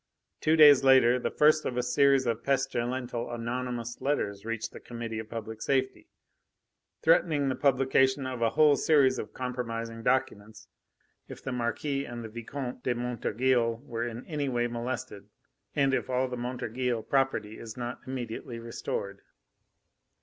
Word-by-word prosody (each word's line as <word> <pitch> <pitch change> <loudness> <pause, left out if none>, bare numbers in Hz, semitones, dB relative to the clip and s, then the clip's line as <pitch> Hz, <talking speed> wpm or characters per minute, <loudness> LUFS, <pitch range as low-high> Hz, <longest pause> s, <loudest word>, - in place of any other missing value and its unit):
Two 155 - +3
days 145 -4 +8
later, 130 -2 +6
the - - -1
first 155 +1 +4
of 125 - -3
a 125 - +1
series 135 +2 +3
of 115 -1 -1
pestilential 125 -2 -1
anonymous 120 0 -4
letters 100 -8 -1
reached 115 -1 -3
the - - -10
Committee 115 -2 -6
of 110 -1 -8
Public 110 -1 -6
Safety, 130 -1 -1 1.0
threatening 145 -5 +3
the 130 - -1
publication 135 0 +2
of 130 -2 -4
a 115 - +3
whole 150 +4 +5
series 140 -4 +3
of - - -6
compromising 115 -3 -4
documents 110 -4 -1 0.6
if - - -10
the 135 - -3
Marquis 125 +4 -2
and 120 0 -7
the 110 - -7
Vicomte 125 +3 -6
de 125 -1 0
Montorgueil 120 0 0
were 120 -3 -3
in 120 +1 -7
any 145 -3 -2
way 120 -1 0
molested, 120 -3 -5 0.5
and 140 -2 +2
if - - -1
all 130 +1 +1
the 125 - -5
Montorgueil 125 -1 -2
property 135 -6 0
is 115 0 -9
not 120 0 -4
immediately 120 -2 -5
restored." 105 -4 -5
125 Hz, 150 wpm, -29 LUFS, 115-135 Hz, 1.0 s, days